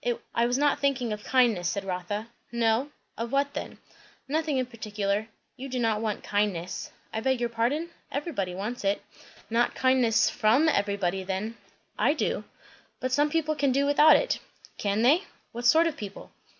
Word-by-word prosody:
"I 235 +1 +2
was 245 +1 +1
not 290 0 +2
thinking 260 -5 0
of 210 0 -7
kindness," 230 -9 +3
said 200 - -2
Rotha. 195 +4 -3 0.2
"No? 235 +3 +1 0.3
Of 230 +1 -3
what 280 +1 +1
then? - - -6 0.5
"Nothing 305 0 0
in 255 - +1
particular. 210 -3 -2 0.3
You 270 +2 -7
do 255 - -3
not 225 -3 +1
want 215 -2 -2
kindness." 190 -4 -1 0.2
"I 220 - -1
beg 260 +1 +1
your 240 -1 0
pardon. 260 +9 -1 0.2
Everybody 265 - -3
wants 215 +6 -4
it." 195 +1 0 0.5
"Not 235 +1 +2
kindness 250 -4 +3
from 235 +9 +3
everybody 200 - 0
then." 195 +4 -3 0.4
"I - - +4
do." - - -1 0.5
"But 255 - -2
some 290 +3 +3
people 310 0 0
can 285 -2 +1
do 275 +2 +2
without 295 +2 +7
it." - - +1 0.4
"Can 205 +2 0
they? 305 +10 +4 0.3
What 240 +1 -1
sort 320 +7 +6
of 330 -3 0
people?" 200 -2 -8
235 Hz, 170 wpm, -27 LUFS, 205-275 Hz, 0.5 s, without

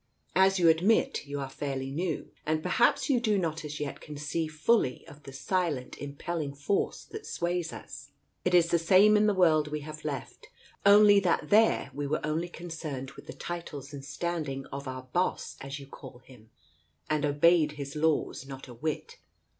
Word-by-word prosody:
As 190 +1 +5
you 175 -2 +4
admit, 190 - +3
you 145 0 -4
are 135 - -3
fairly 135 0 -4
new, 165 +2 -3
and 155 0 -1
perhaps 235 +6 +2
you 270 -5 +3
do 215 -4 +1
not 165 -3 -2
as 150 0 -6
yet 145 -2 -5
conceive 150 +2 -3
fully 155 - +1
of 145 - -13
the 135 - -8
silent 150 -2 -2
impelling 145 +1 -4
force 145 +8 -1
that 435 0 -9
sways 175 -1 -2
us. - - -10 0.3
It 180 0 +2
is 170 -1 +5
the 170 - +4
same 190 +6 +6
in 210 0 +4
the 210 - +2
world 160 -5 +4
we 150 0 -4
have 155 +1 -9
left, 140 -4 -6 0.4
only 205 0 +8
that 170 -5 0
there 215 -9 +4
we 145 +1 -3
were 145 - 0
only 160 +3 -1
concerned 155 -6 -6
with 135 - -14
the - - -7
titles 150 -5 -7
and 140 -1 -7
standing 145 -2 -3
of 140 0 -5
our 130 0 -5
' 130 - -27
boss,' 180 +1 0
as 135 +1 -6
you 140 - -10
call 130 -2 -11
Him, 115 -4 -17 0.6
and 155 -1 0
obeyed 150 +2 +4
His 140 -1 -7
laws 150 -3 0
not 135 -1 -9
a 125 - -10
whit. 150 +6 -4
155 Hz, 185 wpm, -29 LUFS, 140-175 Hz, 0.6 s, only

